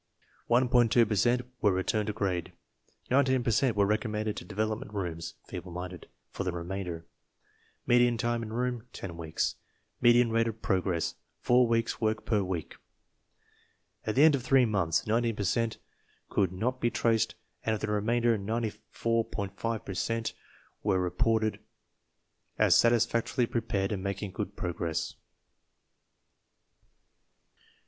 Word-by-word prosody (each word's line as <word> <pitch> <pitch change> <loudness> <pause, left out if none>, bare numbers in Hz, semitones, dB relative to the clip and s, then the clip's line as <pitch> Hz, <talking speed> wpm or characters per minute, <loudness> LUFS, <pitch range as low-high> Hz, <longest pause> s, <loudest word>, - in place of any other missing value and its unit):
2 120 -1 +4
per 105 - -2
cent 120 +5 +3 0.2
were 105 - +4
returned 100 +3 0
to - - 0
grade 90 -4 -2 0.6
19 130 -1 +3
per 120 - +1
cent 120 +1 +2
were 100 -1 +4
recommended 105 0 -1
to - - -6
Development 110 +4 -3
Rooms 85 -5 -4
(feeble 90 - -7
minded) 90 0 -7 0.2
For - - -4
the 90 - -1
remainder 85 -1 -5 0.8
Median 120 -1 +4
time 120 0 0
in 110 -1 -6
room, 125 0 -2
10 85 -4 -6
weeks 80 -2 -2 0.4
Median 120 0 +5
rate 115 0 +2
of 110 -1 -4
progress, 90 -4 0 0.3
4 125 0 +4
weeks' 115 0 0
work 110 0 0
per 105 -3 +2
week 90 -4 -4 1.3
At 110 - -2
the 140 - +6
end 160 -1 +7
of 140 - 0
three 130 0 +4
months, 95 -7 +1
19 115 +1 +1
per 105 - -3
cent 110 +3 0 0.5
could 95 -3 +1
not 125 +7 -2
be 120 - +3
traced, 115 -2 +1 0.3
and 110 - +1
of 105 - -7
the 105 - -1
remainder 115 +3 +2
94.5 115 0 -2
per 95 - -5
cent 115 +4 -1 0.5
were 95 - +2
re 90 -1 -1
ported 110 -4 +1 1.0
as - - +5
satisfactorily 115 +1 +3
prepared 105 -4 -1
and 100 -3 -2
making 100 +1 -3
good - - -5
progress. 85 -2 -2
110 Hz, 140 wpm, -29 LUFS, 95-120 Hz, 1.3 s, end